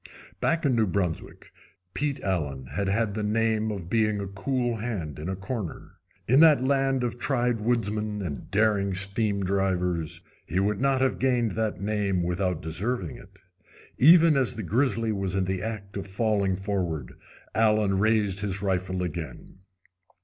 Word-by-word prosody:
Back 165 -1 +1
in 135 - +3
New 110 -2 +2
Brunswick 90 -3 -3 0.4
Pete 145 +6 -1
Allen 75 -9 -2
had 100 -1 -1
had 105 +1 +1
the 110 - -3
name 110 +1 +1
of 95 -5 -6
being 105 0 +1
a 100 - -3
cool 120 +5 -2
hand 100 -11 -4
in 80 +4 -4
a 95 - -2
corner. 100 -1 -6 0.3
In 130 +5 +5
that 150 -5 +6
land 135 -1 +1
of 120 0 -3
tried 120 -3 0
woodsmen 105 -2 -1
and 75 -6 -6
daring 100 -2 +2
stream 100 +1 0
drivers 90 -3 0 0.3
he 90 - 0
would 105 +3 0
not 135 -1 +2
have 130 -1 +1
gained 125 -4 +2
that 110 +1 -2
name 100 -3 0
without 90 -1 -1
deserving 90 +4 -2
it. 95 +1 -17 0.6
Even 165 +2 +7
as 130 -3 +1
the 110 - -5
grizzly 115 - +1
was 95 -2 -2
in 95 -1 +1
the 95 0 -2
act 105 -3 -5
of 100 0 -4
falling 100 -1 +1
forward 90 - -3 0.4
Allen 105 -3 +3
raised 105 -2 +2
his 100 -1 -2
rifle 95 -1 -1
again. 85 0 -6
100 Hz, 160 wpm, -26 LUFS, 95-115 Hz, 0.6 s, Even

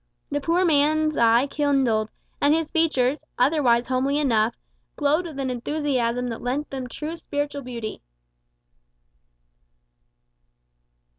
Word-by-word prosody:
The 290 0 -1
poor 340 +5 +2
man's 310 0 +2
eye 235 +2 +4
kindled, 270 -7 +1 0.3
and 290 +2 +4
his 320 -1 -2
features, 295 -4 +1
otherwise 250 -3 +3
homely 260 +3 0
enough, 230 -6 +2 0.4
glowed 305 +4 +1
with 310 -4 -9
an 265 -2 -2
enthusiasm 250 -2 -1
that 230 - -6
lent 270 +5 -3
them 260 -2 -4
true 310 +6 -5
spiritual 290 -3 -4
beauty. 235 -4 -6
280 Hz, 115 wpm, -24 LUFS, 245-300 Hz, 0.4 s, eye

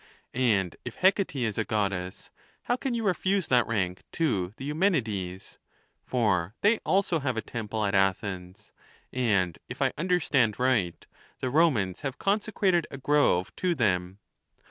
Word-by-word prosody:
And 105 -8 +1
if 125 - -7
Hec 190 +3 +4
ate 190 -7 -2
is 115 -5 -1
a - - +2
Goddess, 100 -4 -2 0.3
how 245 - +1
can 255 -1 -2
you 230 - -2
refuse 190 -1 +1
that 125 -2 +4
rank 95 -5 -1
to 105 - 0
the 135 - -7
Eumenides? 115 - -1 0.4
for 105 -6 0
tlicy 215 +2 +4
also 185 -4 +1
have 130 -4 -2
a - - 0
temple 110 -2 -3
at 100 - -1
Athens, 95 -2 -1 0.4
and, 100 -9 +1
if - - -7
I - - +1
understand 150 - +2
riglit, 125 -9 +1 0.4
the 130 - -2
Romans 125 - +2
have 135 -2 -4
consecrated 195 -4 +1
a 140 - -7
grove 135 -10 +2
to 180 -2 0
them. 95 - 0
120 Hz, 150 wpm, -27 LUFS, -, 0.4 s, Hec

